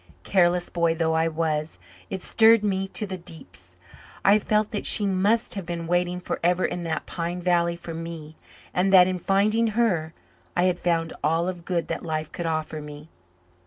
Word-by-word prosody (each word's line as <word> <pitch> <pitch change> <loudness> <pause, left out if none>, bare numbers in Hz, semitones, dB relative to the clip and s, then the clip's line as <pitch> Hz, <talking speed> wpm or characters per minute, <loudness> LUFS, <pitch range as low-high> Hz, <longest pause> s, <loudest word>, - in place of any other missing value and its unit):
Careless 175 -2 +2
boy 170 -1 0
though 160 -1 0
I 160 0 +2
was, 155 -1 -2 0.3
it 190 -1 -5
stirred 225 -1 +5
me 195 -1 0
to 210 - -2
the 190 -2 -6
deeps. 160 - -10 0.5
I 205 +2 +6
felt 215 0 0
that 205 - -1
she 210 - +5
must 200 +4 +1
have 195 -4 -6
been 170 -1 -4
waiting 175 +1 0
forever 180 0 0
in 175 - -3
that 160 -1 -3
pine 175 +1 -4
valley 170 -1 +1
for 170 -1 -8
me 160 -1 -7 0.4
and 185 +2 +1
that, 185 -2 +8
in 185 0 -2
finding 210 +5 +2
her, 170 -9 +1 0.4
I 175 - +3
had 180 -1 +1
found 165 -2 0
all 165 +3 +1
of 175 -2 -5
good 175 -3 -1
that - - -3
life 155 -2 -3
could 175 -2 -4
offer 155 -1 -3
me. 150 +1 -10
175 Hz, 185 wpm, -25 LUFS, 165-190 Hz, 0.5 s, that